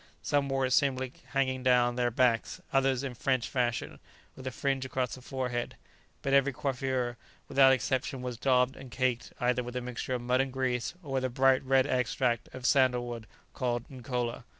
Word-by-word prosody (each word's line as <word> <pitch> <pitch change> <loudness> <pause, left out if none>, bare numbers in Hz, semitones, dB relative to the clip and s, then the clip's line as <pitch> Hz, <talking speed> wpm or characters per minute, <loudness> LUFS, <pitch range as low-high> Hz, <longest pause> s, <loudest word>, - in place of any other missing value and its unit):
Some 145 -1 +1
wore 135 -1 +1
it 130 - -2
simply 130 -1 +2
hanging 130 -2 0
down 125 -1 +3
their 120 -1 +1
backs, 120 -1 +1
others 135 -1 +2
in 135 -2 -3
French 130 0 0
fashion, 120 -3 -1 0.4
with 130 -1 -8
a - - -2
fringe 135 +1 -1
across 130 -1 -2
the 130 - -8
forehead; 125 -2 -3 0.5
but 135 - 0
every 140 0 +5
coiffure, 130 -2 -2 0.3
without 135 -1 +6
exception, 130 0 0
was 125 -1 -3
daubed 125 -1 +3
and 135 -1 -10
caked 125 -1 -1
either 125 0 +1
with 125 0 -7
the 125 - -1
mixture 125 +1 -3
of 125 - -3
mud 125 +1 +2
and 135 0 -2
grease, 130 +1 -1
or 145 - -8
with 130 -1 0
a - - 0
bright 130 +1 +3
red 135 0 +3
extract 125 -2 0
of 130 -1 -8
sandal 130 -3 +3
wood 115 -2 -6 0.3
called 120 -2 -2
nkola. 125 -2 -3
130 Hz, 190 wpm, -30 LUFS, 125-135 Hz, 0.5 s, without